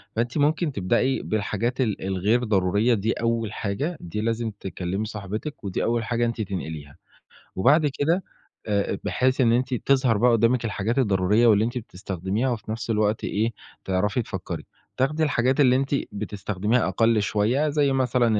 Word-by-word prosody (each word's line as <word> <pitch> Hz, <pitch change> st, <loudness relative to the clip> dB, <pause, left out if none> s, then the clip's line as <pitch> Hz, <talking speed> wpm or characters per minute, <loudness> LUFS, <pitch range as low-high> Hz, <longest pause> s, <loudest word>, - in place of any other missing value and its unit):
فأنتِ 120 Hz, +3 st, -1 dB
ممكن 155 Hz, +2 st, +2 dB
تبدأي 120 Hz, +6 st, +1 dB
بالحاجات 110 Hz, +4 st, -1 dB
ال 110 Hz, -5 st, -1 dB
الغير 95 Hz, +6 st, +1 dB
ضرورية 105 Hz, +2 st, +2 dB
دي 110 Hz, +1 st, 0 dB
أول 115 Hz, -2 st, -1 dB
حاجة 140 Hz, -, -3 dB
دي 90 Hz, +5 st, -5 dB
لازم 115 Hz, 0 st, -1 dB
تكلّمي 95 Hz, +2 st, -3 dB
صاحبتِك 105 Hz, +7 st, -6 dB
ودي 95 Hz, -2 st, -2 dB
أول 115 Hz, 0 st, 0 dB
حاجة 120 Hz, +1 st, 0 dB
أنتِ 115 Hz, -1 st, -2 dB
تنقليها. 80 Hz, -8 st, -6 dB, 0.6 s
وبعد 145 Hz, -, +4 dB
كده 170 Hz, +6 st, +2 dB, 0.4 s
آآ 100 Hz, -1 st, 0 dB
بحيث 130 Hz, +1 st, +1 dB
إن 115 Hz, -2 st, +4 dB
أنتِ 130 Hz, +2 st, +1 dB
تظهر 130 Hz, -2 st, +2 dB
بقى 125 Hz, +3 st, +4 dB
قُدّامِك 115 Hz, +1 st, +2 dB
الحاجات 110 Hz, +3 st, -1 dB
الضرورية 105 Hz, 0 st, +3 dB
واللي 110 Hz, -1 st, +5 dB
أنتِ 120 Hz, +2 st, -3 dB
بتستخدميها 100 Hz, +2 st, -3 dB
وفي 110 Hz, -3 st, -4 dB
نفس 115 Hz, +1 st, -5 dB
الوقت 105 Hz, -1 st, +1 dB
إيه، 110 Hz, +3 st, 0 dB, 0.3 s
تعرفي 100 Hz, +5 st, 0 dB
تفكّري. 100 Hz, -4 st, -6 dB, 0.3 s
تاخدي 150 Hz, +5 st, +1 dB
الحاجات 130 Hz, -2 st, +1 dB
اللي 130 Hz, -3 st, +5 dB
أنتِ 135 Hz, +2 st, +1 dB, 0.2 s
بتستخدميها 105 Hz, +2 st, -1 dB
أقَل 115 Hz, -1 st, +2 dB
شوية 115 Hz, +10 st, +1 dB
زي 145 Hz, -2 st, +2 dB
مثلًا 125 Hz, -4 st, +2 dB
115 Hz, 155 wpm, -24 LUFS, 100-125 Hz, 0.6 s, واللي